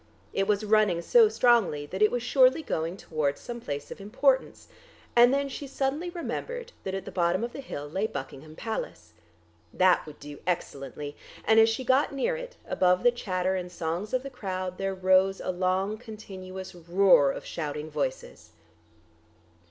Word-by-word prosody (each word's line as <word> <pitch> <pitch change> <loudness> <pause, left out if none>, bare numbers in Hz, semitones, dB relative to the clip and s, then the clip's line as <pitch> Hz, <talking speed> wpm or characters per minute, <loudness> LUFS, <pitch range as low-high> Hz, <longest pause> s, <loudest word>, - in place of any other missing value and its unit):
It 195 0 0
was 210 0 +1
running 210 -5 +3
so 460 -3 +6
strongly 230 - +3
that 190 +7 -6
it 215 - +6
was 245 -1 -2
surely 260 +4 +4
going 165 - -2
towards 150 -6 -2
some 240 -1 -7
place 145 -7 -5
of - - -8
importance, 260 +6 +1 0.5
and 240 +1 +7
then 280 +1 +1
she 275 +1 -6
suddenly 275 +6 -2
remembered 480 +7 -5
that 190 0 -3
at 195 -1 -5
the - - -7
bottom 175 +3 +1
of 235 - -4
the 280 - -6
hill 145 - -6
lay 190 +8 -1
Buckingham 140 -1 -8
Palace. 85 - -5 0.6
That 185 -1 +4
would 150 - -11
do 145 0 -10
excellently; 145 -4 -3 0.3
and 220 0 +5
as 225 0 +6
she 225 +4 -2
got 260 +3 +3
near 485 - 0
it, - - -8
above 180 0 +2
the 245 - +6
chatter 185 -5 -1
and 180 -1 -4
songs 175 +4 -3
of 255 0 0
the 275 - -7
crowd 185 -6 -4
there 195 0 -1
rose 190 +1 +3
a - - -2
long, 190 +3 0
continuous 190 -5 -9
roar 175 -4 +4
of - - -7
shouting 150 -1 -5
voices. 145 -3 -4
195 Hz, 175 wpm, -27 LUFS, 170-245 Hz, 0.6 s, and